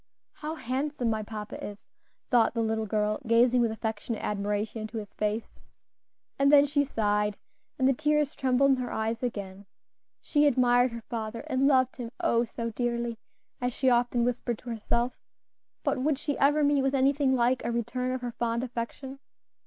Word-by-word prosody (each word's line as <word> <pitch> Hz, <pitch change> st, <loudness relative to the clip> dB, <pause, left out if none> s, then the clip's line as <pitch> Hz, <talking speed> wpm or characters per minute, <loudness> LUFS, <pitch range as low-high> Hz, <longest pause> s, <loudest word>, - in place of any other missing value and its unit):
"How 310 Hz, +1 st, -5 dB
handsome 260 Hz, -2 st, -2 dB
my 220 Hz, 0 st, -1 dB
papa 210 Hz, 0 st, -7 dB
is!" 205 Hz, -, -6 dB, 0.5 s
thought 240 Hz, -1 st, +4 dB
the 230 Hz, -, +1 dB
little 220 Hz, 0 st, -1 dB
girl, 210 Hz, +2 st, 0 dB
gazing 240 Hz, +2 st, +4 dB
with 235 Hz, -, +2 dB
affectionate 220 Hz, 0 st, -4 dB
admiration 210 Hz, +2 st, -2 dB
into 215 Hz, +1 st, -6 dB
his 210 Hz, -2 st, -7 dB
face. 215 Hz, +1 st, -3 dB, 0.8 s
And 280 Hz, +1 st, +5 dB
then 290 Hz, -1 st, +7 dB
she 285 Hz, 0 st, +1 dB
sighed, 210 Hz, -5 st, 0 dB, 0.4 s
and 265 Hz, -2 st, +2 dB
tears 300 Hz, -1 st, +2 dB
trembled 265 Hz, +1 st, +3 dB
in 265 Hz, -, +3 dB
her 250 Hz, -1 st, -3 dB
eyes 220 Hz, +1 st, -2 dB
again. 200 Hz, -5 st, -5 dB, 0.5 s
She 295 Hz, -1 st, +2 dB
admired 245 Hz, -2 st, +4 dB
her 230 Hz, -1 st, -7 dB
father, 225 Hz, -1 st, -4 dB
and 265 Hz, +1 st, +1 dB
loved 260 Hz, -3 st, +3 dB
him, 240 Hz, -3 st, -5 dB
"oh! 240 Hz, -10 st, +2 dB
so 230 Hz, 0 st, -4 dB
dearly," 235 Hz, 0 st, -2 dB, 0.4 s
as 245 Hz, 0 st, -1 dB
she 260 Hz, +1 st, +2 dB
often 240 Hz, 0 st, +2 dB
whispered 240 Hz, -1 st, -1 dB
to 245 Hz, -, -8 dB
herself; 235 Hz, +2 st, -1 dB, 0.6 s
but 265 Hz, -, 0 dB
would 285 Hz, +2 st, +1 dB
she 290 Hz, 0 st, -2 dB
ever 295 Hz, +2 st, +4 dB
meet 285 Hz, -1 st, +3 dB
with 270 Hz, +1 st, +1 dB
anything 270 Hz, 0 st, +3 dB
like 245 Hz, +1 st, +2 dB
a -, -, -1 dB
return 240 Hz, +2 st, -2 dB
of 255 Hz, 0 st, -3 dB
her 245 Hz, -1 st, -3 dB
fond 235 Hz, +1 st, -1 dB
affection? 260 Hz, +2 st, -5 dB
240 Hz, 175 wpm, -28 LUFS, 225-265 Hz, 0.8 s, then